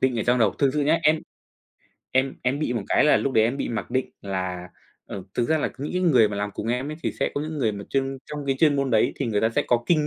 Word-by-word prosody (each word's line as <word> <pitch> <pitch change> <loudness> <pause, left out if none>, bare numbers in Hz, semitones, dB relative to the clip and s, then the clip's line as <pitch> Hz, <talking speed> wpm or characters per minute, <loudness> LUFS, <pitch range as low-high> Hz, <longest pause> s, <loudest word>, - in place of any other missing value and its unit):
định 130 -3 +1
ở - - +1
trong 120 +2 +2
đầu. 110 -4 +3
Thực 140 -2 +3
sự 150 - +1
nhá, 155 +3 +3
em 155 +1 +3 0.9
em 130 +1 +1
em 130 +3 0
bị 150 -5 -1
một 115 -4 -2
cái - - +4
là 150 - +5
lúc 140 - -1
đấy 110 -3 +4
em 120 +5 0
bị - - -3
mặc 115 0 -4
định 130 0 -1
là, 95 -2 -4 0.4
ờ, 95 - -6
thực 120 - 0
ra 160 - +3
là - - -1
những 145 - -4
cái 180 - 0
người 125 - +5
mà 100 - -5
làm 105 0 -2
cùng - - -5
em 125 +5 -1
ấy 155 - -6
thì - - -1
sẽ - - +1
có 145 - -1
những 155 0 -4
người 115 -6 +1
mà 100 -1 -7
chuyên 135 0 -1
trong 150 -2 -6
cái 135 -1 +1
chuyên 150 -3 +4
môn 135 -1 0
đấy 110 - +3
thì 140 - -2
người 105 -3 0
ta 110 - +3
sẽ 115 - 0
có 120 -1 +2
kinh 155 -3 +3
130 Hz, 305 wpm, -24 LUFS, 110-145 Hz, 0.9 s, là